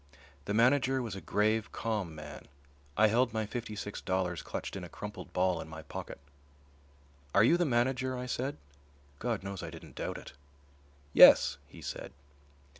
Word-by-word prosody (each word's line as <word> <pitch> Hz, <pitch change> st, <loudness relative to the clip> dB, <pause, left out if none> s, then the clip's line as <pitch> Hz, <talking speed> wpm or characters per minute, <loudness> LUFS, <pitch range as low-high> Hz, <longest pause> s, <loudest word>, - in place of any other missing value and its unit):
The 100 Hz, -, -1 dB
manager 130 Hz, +3 st, +4 dB
was 110 Hz, -5 st, -5 dB
a 95 Hz, -, -7 dB
grave, 110 Hz, +1 st, +1 dB
calm 105 Hz, -8 st, -3 dB
man. 75 Hz, -2 st, -9 dB, 0.5 s
I 110 Hz, -, +6 dB
held 120 Hz, +3 st, +3 dB
my 110 Hz, -1 st, -1 dB
fifty 110 Hz, 0 st, -5 dB
six 105 Hz, 0 st, -5 dB
dollars 90 Hz, -3 st, -1 dB
clutched -, -, -5 dB
in 95 Hz, -, -5 dB
a 90 Hz, -, -8 dB
crumpled 105 Hz, +5 st, -8 dB
ball 90 Hz, -1 st, +1 dB
in -, -, -8 dB
my 80 Hz, 0 st, -8 dB
pocket. -, -, -7 dB, 1.2 s
"Are 100 Hz, -, +7 dB
you 140 Hz, +9 st, +6 dB
the 175 Hz, 0 st, +2 dB
manager?" 130 Hz, 0 st, +1 dB
I 125 Hz, -, -4 dB
said. 130 Hz, +3 st, -2 dB, 0.6 s
God 115 Hz, -4 st, -2 dB
knows 100 Hz, -1 st, -5 dB
I -, -, -5 dB
didn't -, -, -11 dB
doubt -, -, -3 dB
it. -, -, -11 dB, 0.8 s
"Yes," 70 Hz, -, +8 dB
he -, -, -13 dB
said. -, -, -6 dB
110 Hz, 170 wpm, -31 LUFS, 95-125 Hz, 1.2 s, Yes